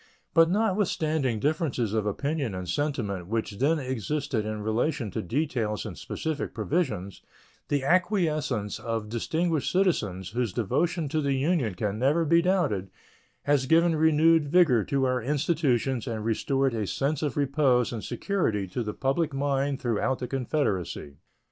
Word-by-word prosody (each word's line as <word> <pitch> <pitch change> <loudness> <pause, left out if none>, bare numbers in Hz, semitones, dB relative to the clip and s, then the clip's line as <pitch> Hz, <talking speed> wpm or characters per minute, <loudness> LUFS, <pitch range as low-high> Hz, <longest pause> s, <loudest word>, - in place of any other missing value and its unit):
But 165 -1 +6
notwithstanding 165 - 0
differences 140 - 0
of 110 -2 0
opinion 140 0 -2
and 90 -1 -5
sentiment 105 - -2
which 110 -1 -3
then 150 +5 +3
existed 130 -3 -2
in 110 -1 -4
relation 115 +1 -1
to - - -3
details 115 - -2
and - - -6
specific 160 -2 -4
provisions, 110 - -2 0.5
the 145 -2 0
acquiescence 155 - +1
of 110 -1 -3
distinguished 160 +7 -1
citizens, 105 - 0
whose 120 -3 -2
devotion 160 - 0
to 155 +2 0
the 140 -1 +1
Union 135 - 0
can 105 +2 -2
never 150 +6 +2
be 170 +2 +4
doubted, 170 - 0 0.5
has 145 -2 +2
given 165 +2 +4
renewed 160 0 +4
vigor 145 - +4
to 135 -2 +1
our 130 -1 0
institutions 135 -2 0
and 110 -2 -3
restored 135 +4 +1
a 110 -3 -2
sense 140 +6 -1
of 150 -4 -2
repose 135 -4 +2
and 110 - -5
security 110 - -1
to 120 - -3
the 105 -2 -4
public 140 +2 0
mind 140 0 0
throughout 120 +2 0
the 125 - -4
Confederacy. 110 - -2
135 Hz, 150 wpm, -27 LUFS, 110-155 Hz, 0.5 s, But